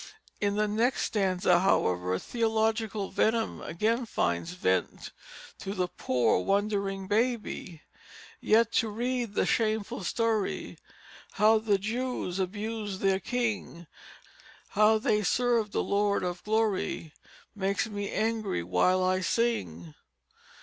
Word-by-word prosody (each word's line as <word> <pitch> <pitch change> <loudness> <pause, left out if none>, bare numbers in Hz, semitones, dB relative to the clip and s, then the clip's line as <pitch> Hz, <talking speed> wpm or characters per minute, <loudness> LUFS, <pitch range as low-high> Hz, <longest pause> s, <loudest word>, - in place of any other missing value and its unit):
In 205 -1 0
the 210 0 +1
next 225 +5 +1
stanza, 185 -4 +2
however, 90 - +1
theological 220 - -1
venom 225 0 0
again 225 +7 -1
finds 85 - -1
vent 95 - -1 0.5
to 195 +1 -5
the 180 -2 0
poor 125 - +1
wondering 200 - -1
baby: 210 -7 -1 0.6
"Yet 230 +1 +3
to 225 - -4
read 240 0 -2
the - - +2
shameful 215 -3 0
story 225 +1 -1 0.5
How 220 +1 +4
the 215 -2 +2
Jews 220 -2 -3
abused 205 +1 -3
their 195 -1 +2
King 210 -6 -3 0.8
How 215 +2 +4
they 215 -2 +1
served 230 0 +1
the - - 0
Lord 200 -1 +1
of 180 0 -4
Glory, 210 -7 -1 0.4
Makes 200 0 -1
me 205 -2 -4
angry 220 - -1
while 135 - +2
I 185 0 +1
sing." 90 - -1
205 Hz, 115 wpm, -28 LUFS, 185-225 Hz, 0.8 s, How